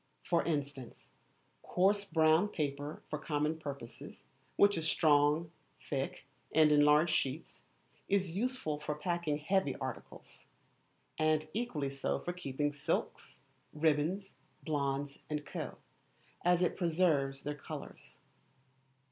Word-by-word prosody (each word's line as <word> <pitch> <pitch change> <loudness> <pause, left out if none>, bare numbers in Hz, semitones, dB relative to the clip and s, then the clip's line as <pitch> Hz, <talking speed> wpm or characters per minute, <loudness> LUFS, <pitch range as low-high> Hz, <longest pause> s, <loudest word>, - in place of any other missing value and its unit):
For 170 -1 +2
instance, 140 -5 -4 0.5
coarse 200 +3 +2
brown 160 +1 +4
paper 145 -4 -3
for 150 - -4
common 150 +1 -1
purposes, 140 -6 -8 0.3
which 205 0 +5
is 160 -2 0
strong, 150 +1 +3 0.3
thick, 135 -1 -4 0.3
and 155 -1 +6
in 145 0 +6
large 150 +3 +5
sheets, 135 -3 -2 0.5
is 190 -4 +1
useful 215 - -1
for 150 0 -3
packing 165 -1 -1
heavy 155 -2 +1
articles; 130 -2 -8 0.7
and 155 0 +2
equally 175 - -2
so 140 0 -1
for 175 - -4
keeping 145 -4 -2
silks, 145 - -3 0.3
ribbons, 160 +6 +1 0.3
blondes, 140 -2 -2
&c., 150 -1 -4 0.8
as 180 0 +4
it 180 - 0
preserves 160 -6 +1
their 145 - -2
colours. 145 - -9
155 Hz, 115 wpm, -33 LUFS, 145-175 Hz, 0.8 s, and